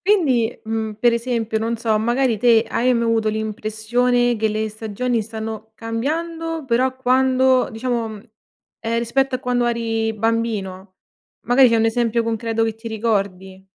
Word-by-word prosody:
Quindi, 275 - +2
mhmm, 220 -1 -2
per 240 +1 +4
esempio, 230 -2 -1
non 230 +1 -1
so, 220 -2 +1
magari 240 +1 +1
te 230 0 +5
hai 250 +2 +2
mai 235 - +1
avuto 225 -1 +1
l'impressione 220 +3 0
che 220 0 +1
le 215 +1 -1
stagioni 220 +3 -2
stanno 220 0 -6
cambiando 320 +8 -3
però 255 +1 +1
quando 260 0 +3
diciamo 225 -2 -3 0.6
ehm, 230 0 -1
rispetto 260 +3 0
a - - 0
quando 245 -1 0
eri 225 -1 -1
bambino? 210 -4 -2 0.5
Magari 250 +1 +6
c'è 230 - +3
un 225 - +2
esempio 235 0 +1
concreto 225 0 -1
che 225 -1 -2
ti 225 +1 -13
ricordi. 195 -4 -2
230 Hz, 150 wpm, -21 LUFS, 220-245 Hz, 0.6 s, Magari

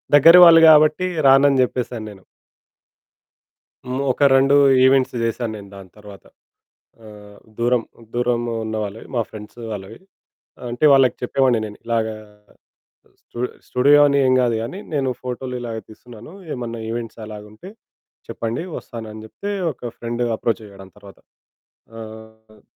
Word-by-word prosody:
దగ్గర 165 +4 +8
వాళ్ళు 165 -1 +8
గాబట్టి 155 +3 +5 0.2
రానని 135 0 +5
చెప్పేసానేను. 110 -6 -5 1.9
ఒక 145 - -2
రెండు 135 +1 +4 0.3
ఈవెంట్సు 130 -2 +2
చేశాను 115 0 -2
నేను 100 -1 -12
దాని 95 -2 -12
తర్వాత. 100 -3 -14 0.8
ఆహ్, 105 -1 -14 0.2
దూరం, 120 0 +1 0.3
దూరం 120 -1 0 0.2
ఉన్న 110 0 -4
వాళ్ళవి 105 +2 -9
మా 115 - +2
ఫ్రెండ్సు 110 +2 -11
వాళ్ళవి. 100 +2 -8 0.7
అంటే 120 +5 -3
వాళ్ళకి 135 -2 +4
చెప్పేవాడిని 125 -2 +1
నేను 105 - -11
ఇలాగా 110 -2 -1 1.1
స్టు 120 - -12 0.3
స్టూడియో 140 +4 +4
అని 140 0 +1
ఏం 130 - +3
గాదు 120 -2 +1
గానీ, 180 +12 -7
నేను 135 -3 0
ఫోటోలు 125 0 -5
ఇలాగా 115 -2 -6
తీస్తున్నాను. 115 - -14 0.2
ఏమన్నా 115 -2 -6
ఈవెంట్స్ 115 0 -6
అలాగుంటే 105 - -11 0.6
చెప్పండి, 115 +8 -4
వస్తానని 110 -2 -9
చెప్తే, 200 - -7 0.2
ఒక 120 -3 -8
ఫ్రెండ్ 120 +1 -4
అప్రోచ్ 115 0 -2
అయ్యాడు. 100 -1 -14
దాని 95 -2 -18
తర్వాత 100 -1 -16 0.8
ఆహ్ 110 -1 -13
115 Hz, 125 wpm, -20 LUFS, 110-130 Hz, 1.9 s, దగ్గర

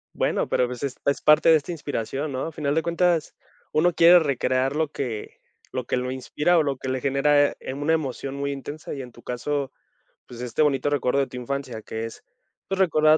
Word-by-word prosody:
Bueno, - - 0
pero, 125 - +2
pues, 125 +2 -7
es 135 -2 -2
es 140 - +1
parte 150 +2 +5
de 160 - +8
esta 155 +3 -1
inspiración, 145 -2 -3
¿no?, 130 - -2
a 165 - -4
final 145 -2 -1
de 160 - +2
cuentas, 170 -1 +1 0.4
uno 170 +3 +3
quiere 175 +1 +8
recrear 135 -2 0
lo 155 -1 0
que 120 -8 -5 0.3
lo 130 -2 -3
que - - 0
lo 125 +1 -2
inspira 150 +6 +1
o - - +5
lo 140 -2 -1
que 130 - -7
le 130 0 -1
genera, 145 +1 +3
eh, - - -6
una 145 +4 0
emoción 140 -3 -2
muy 140 0 -2
intensa, 145 +2 -6
y 140 - -5
en 125 -1 -9
tu 120 - -17
caso, 140 +3 -2 0.5
pues, 120 -1 -10
este 125 +5 0
bonito 145 -1 +2
recuerdo 140 -2 +1
de 135 - +1
tu 125 - -9
infancia, 125 -3 -4
que 110 +1 -4
es, 115 - -10 0.4
pues, 195 0 -2
recordar 155 -4 +5
140 Hz, 220 wpm, -24 LUFS, 130-155 Hz, 0.5 s, de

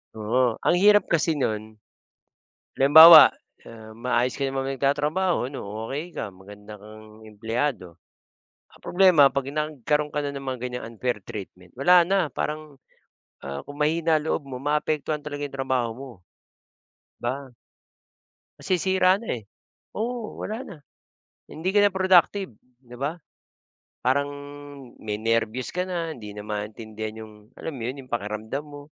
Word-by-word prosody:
Oo. 115 +2 0
Ang - - +2
hirap 205 +3 +5
kasi 165 -2 +1
no'n, 110 -2 -3 1.0
halimbawa, 160 +3 +11 0.4
ah, 110 -1 -12
maayos 120 +3 -1
ka 140 - 0
naman 135 0 -2
nagtatrabaho 145 +2 0
ano, 135 - -6 0.3
okey 155 +7 -6
ka, 105 - -5
maganda 105 +2 -13
kang 110 +1 -14
empleyado, 110 - -3 0.7
ang - - -20
problema 180 -6 +5
'pag 140 0 -2
nagkaroon 150 0 -2
ka 150 - -1
na 145 - -3
ng 135 - -9
mga 130 -2 -4
ganyang 125 0 -5
unfair 120 +1 -2
treatment 90 -3 -9
wala 175 +7 +5
na 190 -3 +1
parang, 150 0 -5 0.7
ah, 70 +1 -5
kung 145 - -9
mahina 160 +2 +2
ang 150 - -3
loob 140 - -3
mo, 130 - -6
maaapektuhan 150 +2 -1
talaga 145 -1 -5
'yong 135 -1 -8
trabaho 130 -3 0
mo, 130 +3 -10 1.1
'di - - -17
ba? 135 +3 -3 1.1
Masisira 185 +1 +2
na, 230 - -10
eh, - - -18 0.5
oo, 230 0 -4
wala 215 - -4
na 195 - -9 0.8
hindi 185 +5 -3
ka 205 - +5
na 205 - +5
productive, 190 - +3 0.3
'di 125 -2 -15
ba? 145 +7 -3 0.8
Parang 140 +3 +1 0.7
may 105 -1 -3
nerbyos 115 +2 -1
ka 180 - 0
na, 170 -3 -4
hindi 105 -5 -10
na 105 0 -9
maintindihan 110 +1 -6
yung, 110 - -16 0.2
alam 160 - -6
mo 125 - -7
yun, 125 +4 -4
yung - - -25
pakiramdam 110 +4 -3
mo. 145 -1 -11
135 Hz, 145 wpm, -24 LUFS, 110-155 Hz, 1.1 s, halimbawa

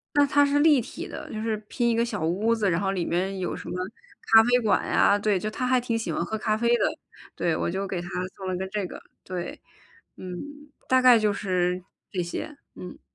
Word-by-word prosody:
那 290 0 +6
它 285 +1 +4
是 285 +1 +2
立 295 -3 +6
体 - - -7
的， - - -8
就 215 - -4
是 220 -1 0
拼 240 -1 0
一 230 - +2
个 230 - +2
小 215 -8 -3
屋 210 +7 +1
子， 205 -3 +1
然 165 - +1
后 195 -1 0
里 180 -3 -2
面 190 +3 -1
有 180 - -2
什 - - -8
么 - - -4 0.6
咖 225 0 +9
啡 245 +1 +3
馆 210 -3 +2
呀， 200 - +4
对， 205 -2 +1
就 215 - -3
她 255 +3 -2
还 255 0 +4
挺 235 -2 -1
喜 225 - -3
欢 - - -1
喝 220 - -3
咖 215 0 0
啡 235 +1 +1
的。 - - +1 0.5
对， 170 -2 0
我 - - -1
就 190 +2 -2
给 180 -2 -3
她 175 - -8 0.3
送 190 -1 -7
了 185 - -1
个 190 +1 -3
这 200 -1 -3
个。 - - -10 0.2
对， 180 -1 -5 0.6
嗯， 180 -1 -7 0.5
大 260 0 +5
概 250 -2 +8
就 210 -1 +2
是 180 -2 -1 0.3
这 180 -2 -2
些， 280 - -5 0.2
嗯。 180 - -10
210 Hz, 250 characters per minute, -26 LUFS, 185-235 Hz, 0.6 s, 咖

